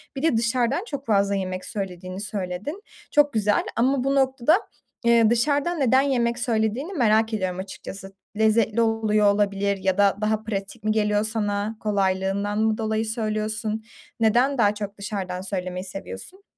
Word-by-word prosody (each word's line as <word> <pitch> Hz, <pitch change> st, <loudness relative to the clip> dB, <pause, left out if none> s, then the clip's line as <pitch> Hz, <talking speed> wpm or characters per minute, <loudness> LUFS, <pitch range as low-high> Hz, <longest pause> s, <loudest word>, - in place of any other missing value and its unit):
Bir 270 Hz, -, -5 dB
de 315 Hz, -8 st, +3 dB
dışarıdan 240 Hz, -, +1 dB
çok 280 Hz, -, -6 dB
fazla 200 Hz, -2 st, +2 dB
yemek 185 Hz, -1 st, -3 dB
söylediğini 185 Hz, -2 st, -5 dB
söyledin. 210 Hz, -, -4 dB, 0.3 s
Çok 290 Hz, -1 st, +4 dB
güzel. 210 Hz, -1 st, +2 dB
Ama 260 Hz, +2 st, +2 dB
bu 275 Hz, +1 st, +1 dB
noktada, 265 Hz, +1 st, +3 dB, 0.5 s
ııı, 230 Hz, -2 st, +5 dB
dışarıdan 285 Hz, +8 st, +1 dB
neden 260 Hz, -1 st, +4 dB
yemek 240 Hz, -4 st, 0 dB
söylediğini 235 Hz, -, 0 dB
merak 225 Hz, -5 st, +2 dB
ediyorum 185 Hz, -3 st, -2 dB
açıkçası. 195 Hz, 0 st, -8 dB, 0.2 s
Lezzetli 220 Hz, +1 st, +3 dB
oluyor 215 Hz, -2 st, +3 dB
olabilir 200 Hz, -1 st, 0 dB
ya 190 Hz, 0 st, 0 dB
da 200 Hz, -1 st, +4 dB
daha 215 Hz, 0 st, 0 dB
pratik 200 Hz, -2 st, -5 dB
mi 215 Hz, -, +1 dB
geliyor 210 Hz, -1 st, +2 dB
sana? 215 Hz, -1 st, -1 dB
Kolaylığından 200 Hz, 0 st, 0 dB
mı 220 Hz, 0 st, +2 dB
dolayı 220 Hz, 0 st, -1 dB
söylüyorsun? 215 Hz, 0 st, -2 dB, 0.4 s
Neden 240 Hz, +5 st, +3 dB
daha 205 Hz, -3 st, +4 dB
çok 205 Hz, -1 st, -6 dB
dışarıdan 190 Hz, -3 st, -4 dB
söylemeyi 185 Hz, -1 st, -4 dB
seviyorsun? 195 Hz, -, -8 dB
215 Hz, 150 wpm, -24 LUFS, 200-235 Hz, 0.5 s, ııı